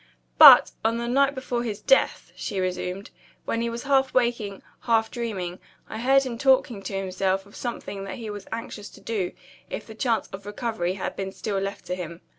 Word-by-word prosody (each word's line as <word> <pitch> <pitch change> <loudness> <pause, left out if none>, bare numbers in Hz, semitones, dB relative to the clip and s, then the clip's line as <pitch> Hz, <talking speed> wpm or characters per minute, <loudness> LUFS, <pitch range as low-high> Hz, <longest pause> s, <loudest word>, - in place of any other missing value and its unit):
"But, - - +10
on 225 +1 +1
the 235 0 -3
night 275 +3 +3
before 250 -2 -2
his 220 -3 -4
death," - - +2
she 200 -4 -4
resumed, 185 +1 -3 0.3
"when 230 - -1
he 235 - -1
was 235 0 -5
half 270 -1 +2
waking, 235 -5 0 0.2
half 225 -2 +1
dreaming, 190 -7 -4 0.3
I - - -6
heard 270 +3 +4
him 240 -3 -5
talking 260 -6 +3
to 195 0 -4
himself 190 0 -1
of 200 - -17
something 215 -5 -5
that 190 - -6
he 225 -3 -6
was 205 -1 -8
anxious 225 -2 -6
to - - -13
do, 200 -6 -2 0.4
if - - -5
the 220 - -10
chance 230 0 0
of 195 +1 -9
recovery 205 -4 -2
had 195 - -4
been 195 -1 -4
still 200 0 -3
left 195 +1 -5
to 180 - -3
him. 170 -2 -6
220 Hz, 200 wpm, -25 LUFS, 195-240 Hz, 0.4 s, But